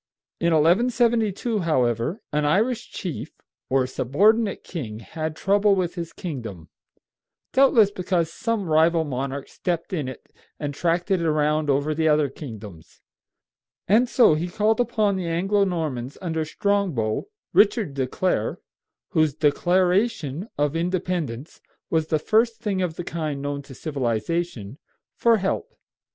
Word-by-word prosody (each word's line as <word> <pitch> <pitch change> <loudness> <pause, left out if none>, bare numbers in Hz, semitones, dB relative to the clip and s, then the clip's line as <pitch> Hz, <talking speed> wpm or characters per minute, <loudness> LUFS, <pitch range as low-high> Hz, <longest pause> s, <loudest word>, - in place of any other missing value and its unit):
In 170 - +1
1172, 225 +5 +2
however, 130 - 0
an 150 0 +1
Irish 225 +11 +1
chief, 175 -7 -6 0.4
or 130 -1 +2
subordinate 200 - +2
king, 120 -12 -6
had 155 +9 -5
trouble 200 +3 +3
with 180 -2 -1
his 170 -2 -5
kingdom, 115 - -7 0.8
doubtless 240 -6 +5
because 180 -4 -1
some 230 -3 -1
rival 160 +1 +3
monarch 135 -1 -4
stepped 170 0 -3
in 150 -7 -1
it 130 - -10 0.3
and 145 -1 -3
tracked 170 +5 0
it 185 -3 +3
around 155 -1 +1
over 140 +2 +1
the 160 +1 +1
other 150 -2 +3
kingdoms, 105 - -10 0.9
and 230 +6 +4
so 245 -12 +5
he 160 +3 -1
called 215 +5 +1
upon 215 -4 +1
the 180 -2 -3
Anglo 195 +5 +1
Normans 150 -8 -3
under 160 -3 -2
Strongbow 170 - -1 0.3
(Richard 205 - +3
de 135 -2 -1
Clare), 185 +7 -1 0.5
whose 155 -6 +2
deClaration 180 - +1
of 145 +1 0
Independence 170 -6 -3 0.3
was 160 -1 +1
the 155 - +2
first 225 +7 +2
thing 195 -3 -1
of 175 -3 -2
the 175 - -5
kind 155 -4 -3
known 145 0 -3
to 135 -1 -13
civilization, 130 -2 -3 0.4
for 230 -1 +4
help. 195 -1 -2
165 Hz, 135 wpm, -24 LUFS, 145-195 Hz, 0.9 s, doubtless